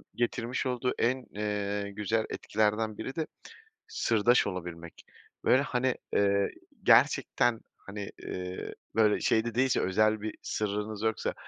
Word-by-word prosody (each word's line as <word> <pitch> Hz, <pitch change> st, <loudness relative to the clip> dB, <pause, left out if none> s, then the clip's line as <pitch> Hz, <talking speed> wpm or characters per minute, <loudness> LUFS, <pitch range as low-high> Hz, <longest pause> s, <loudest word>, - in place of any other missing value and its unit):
getirmiş 120 Hz, +1 st, -1 dB
olduğu 125 Hz, 0 st, 0 dB
en, 125 Hz, +2 st, +1 dB
eee, 105 Hz, -1 st, -2 dB
güzel 105 Hz, +2 st, 0 dB
etkilerden 110 Hz, 0 st, 0 dB
biri 130 Hz, +4 st, -5 dB
de 160 Hz, -2 st, -2 dB, 0.6 s
sırdaş 115 Hz, +2 st, +3 dB
olabilmek 85 Hz, -3 st, -7 dB, 0.4 s
ve 130 Hz, -, +5 dB
hani, 130 Hz, -2 st, 0 dB, 0.2 s
eee, 100 Hz, 0 st, +3 dB, 0.3 s
gerçekten 120 Hz, -2 st, +4 dB, 0.2 s
hani, 100 Hz, 0 st, -7 dB, 0.2 s
iii, 90 Hz, 0 st, -5 dB, 0.2 s
böyle 110 Hz, -2 st, +4 dB
şey 110 Hz, 0 st, +2 dB
de 120 Hz, -1 st, -4 dB
değilse, 130 Hz, +1 st, +3 dB
özel 110 Hz, +3 st, +2 dB
bir 110 Hz, 0 st, -4 dB
sırrınız 105 Hz, 0 st, -3 dB
yoksa 110 Hz, -1 st, 0 dB
110 Hz, 125 wpm, -29 LUFS, 100-120 Hz, 0.6 s, ve